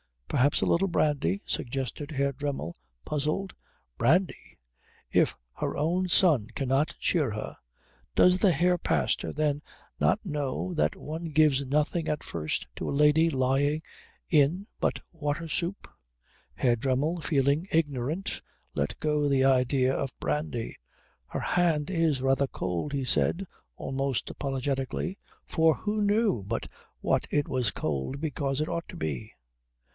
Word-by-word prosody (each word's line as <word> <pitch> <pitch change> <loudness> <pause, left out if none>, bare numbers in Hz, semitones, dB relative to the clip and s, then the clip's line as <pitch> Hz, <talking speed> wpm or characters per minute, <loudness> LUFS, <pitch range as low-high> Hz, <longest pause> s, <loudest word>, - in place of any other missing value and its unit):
"Perhaps 140 +3 +2
a - - +2
little 190 +3 +3
brandy?" 145 - +1
suggested 135 +3 -3
Herr 140 -1 +1
Dremmel, 140 - -3 0.3
puzzled. 155 +7 -1 0.4
"Brandy! 175 +10 +1 0.5
If - - +3 0.2
her - - -2
own 175 +5 +1
son 160 - +4
cannot 135 +2 +1
cheer 150 -9 +1
her 105 +1 -5 0.6
Does 180 0 +5
the 190 -1 +5
Herr 180 +1 +3
Pastor - - 0
then 150 -1 0 0.4
not - - +3
know 150 +2 -2
that 160 - +1
one 160 +3 -6
gives 150 -3 +3
nothing 150 +4 +1
at 150 - -1
first 80 -2 -2
to - - -3
a - - -1
lady 150 +3 +4
lying 140 +2 +1 0.5
in 160 +5 +3
but - - 0
water 155 0 -3
soup?" 175 +5 -3 0.7
Herr 120 -2 +2
Dremmel, 140 +8 0
feeling 145 +3 +1
ignorant, 155 +3 -1 0.3
let 70 - -2
go 150 -1 +1
the 135 -1 +3
idea 130 0 +3
of 135 -1 -3
brandy. 150 -7 -2 0.5
"Her - - -4
hand 165 -3 +1
is 160 -7 +1
rather 135 +1 +3
cold," 90 - -3
he 140 -1 -1
said, 180 +8 +2 0.3
almost 135 -2 -2
apologetically, 135 +6 -2 0.3
for 160 -1 +3
who 210 0 -2
knew 205 - +2
but 95 - -3 0.3
what - - +1
it 145 -1 +1
was 125 -5 +1
cold 80 - -3
because 140 -2 -1
it 155 - -1
ought 170 - -3
to - - -8
be? 75 -5 -4
145 Hz, 140 wpm, -28 LUFS, 135-165 Hz, 0.7 s, Does